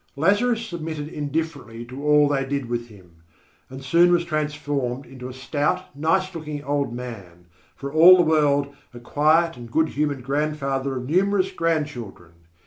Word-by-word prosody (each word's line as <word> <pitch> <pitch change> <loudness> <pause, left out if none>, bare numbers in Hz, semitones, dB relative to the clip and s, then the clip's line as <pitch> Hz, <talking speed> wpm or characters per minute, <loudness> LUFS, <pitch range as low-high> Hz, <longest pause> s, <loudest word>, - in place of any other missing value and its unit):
Lazarus 220 - +2
submitted 160 -6 -5
indifferently 145 -6 -4
to 130 +4 -9
all 150 0 +5
they 140 -1 0
did 140 -1 -3
with 120 0 -3
him, 95 -6 -18 0.5
and 135 +1 -9
soon 170 +6 +4
was 175 -1 +2
transformed 145 -5 -2
into 130 -1 -9
a - - -7
stout, 145 +6 -2
nice 185 +6 0
looking 150 -3 -6
old 140 -2 -1
man, 100 -9 -9 0.3
for 140 +1 -7
all 170 +4 +9
the 175 - +4
world 145 -3 +2 0.2
a - - -8
quiet 155 +5 +2
and 120 -1 -10
good 160 +6 +1
humoured 145 -3 -2
grandfather 140 -1 -1
of 125 0 -5
numerous 190 +4 +2
grandchildren. 150 - -3
145 Hz, 155 wpm, -23 LUFS, 130-160 Hz, 0.5 s, all